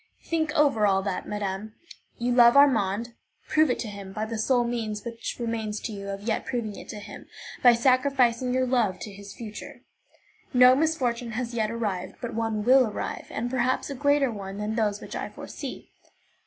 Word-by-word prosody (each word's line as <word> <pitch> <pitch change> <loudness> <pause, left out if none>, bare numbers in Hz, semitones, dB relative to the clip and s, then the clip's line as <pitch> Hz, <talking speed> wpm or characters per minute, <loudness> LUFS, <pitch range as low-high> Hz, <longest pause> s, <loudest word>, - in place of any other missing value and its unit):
Think 315 -2 -1
over 275 -9 +4
all 195 -1 +2
that, 195 -2 -3
madame. 210 +1 -4 0.4
You 240 +1 -1
love 240 +1 +7
Armand; 235 -4 +3 0.3
prove 310 -1 +3
it 250 - +1
to 235 - -4
him 200 -2 -8
by 215 +1 -2
the 225 +1 -5
sole 245 +2 +2
means 225 -3 -3
which 230 -1 -5
remains 225 -3 -2
to 230 - -4
you 200 -1 -6
of 200 0 -5
yet 220 0 -1
proving 235 -6 -3
it - - -11
to - - -6
him, 210 - -10 0.3
by 245 -1 +8
sacrificing 255 -1 +2
your 255 0 +2
love 235 -7 +1
to 210 - -6
his 200 0 -10
future. 240 +4 -9 0.7
No 250 +1 +8
misfortune 250 -6 0
has 240 +1 -3
yet 220 -2 0
arrived, 205 -5 -3
but 240 -1 -5
one 225 -1 -1
will 255 +1 +6
arrive, 210 - -5
and 240 - -3
perhaps 255 +2 0
a - - -2
greater 285 -1 +2
one 195 -2 -7
than 210 +1 -2
those 215 -2 0
which - - -8
I - - -4
foresee. - - -8
230 Hz, 190 wpm, -26 LUFS, 210-255 Hz, 0.7 s, by